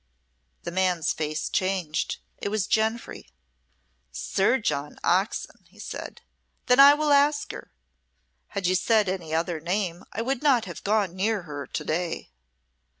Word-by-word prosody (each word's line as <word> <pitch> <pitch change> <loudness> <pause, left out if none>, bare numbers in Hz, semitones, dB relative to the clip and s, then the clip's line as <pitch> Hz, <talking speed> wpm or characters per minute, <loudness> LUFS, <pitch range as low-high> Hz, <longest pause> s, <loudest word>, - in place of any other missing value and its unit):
The 170 - -4
man's 180 -3 +1
face 155 0 -3
changed. 185 -5 -1 0.2
It - - -2
was 210 -1 0
Jenfry. 220 +2 -1 0.8
"Sir 140 - +1
John 145 - -2
Oxon," 190 +5 0
he - - -24
said. - - -7 0.4
"Then 250 +1 +4
I 280 +1 +10
will 300 0 0
ask 290 +1 +3
her. - - -9 0.8
Had 195 - -4
you 180 - +3
said 210 +3 +3
any 180 -4 -3
other 165 +1 -1
name 175 +1 -2
I 225 - -3
would 265 +1 -1
not 265 -6 +3
have - - -8
gone 200 -3 +1
near 205 +1 0
her 145 -4 -7
to - - -4
day." 165 - -3
190 Hz, 150 wpm, -26 LUFS, 170-225 Hz, 0.8 s, I